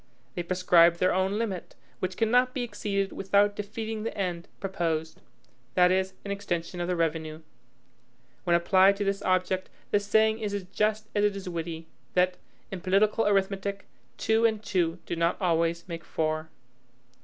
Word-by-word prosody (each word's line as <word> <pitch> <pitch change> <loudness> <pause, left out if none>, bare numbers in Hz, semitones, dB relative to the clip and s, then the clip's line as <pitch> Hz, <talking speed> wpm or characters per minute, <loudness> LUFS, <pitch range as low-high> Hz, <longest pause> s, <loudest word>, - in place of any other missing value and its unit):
They 175 - -3
prescribe 175 -1 +4
their 185 +1 +2
own 190 +2 +1
limit; 205 -6 -4 0.2
which 185 -1 -3
cannot 245 +3 +3
be 255 - -1
exceeded 200 -3 -2
without 200 +1 +2
defeating 220 +1 -4
the 225 0 -4
end 180 -3 -2
proposed, 165 -3 -2 0.5
that 180 0 +5
is, 190 0 +1
an 200 - -3
extension 175 -3 -3
of 175 - -2
the 180 - 0
revenue. 160 -1 -2 1.0
When 170 - +3
applied 190 +3 +5
to 205 - -2
this 195 0 -1
object, 185 0 0 0.2
the 205 - +4
saying 220 +2 +2
is 210 -2 -2
as 200 - -3
just 215 +3 -1
as 205 - +1
it 205 -1 +2
is 195 -1 -7
witty, 165 -1 -4 0.3
that, 180 0 +3 0.3
"in 190 -2 -5
political 205 +4 +2
arithmetic, 195 0 0 0.3
two 220 +1 +2
and 220 -2 +2
two 180 -4 0
do - - -3
not 170 +1 +1
always 170 -1 +1
make 165 -2 -6
four." 155 0 -2
190 Hz, 165 wpm, -28 LUFS, 170-205 Hz, 1.0 s, that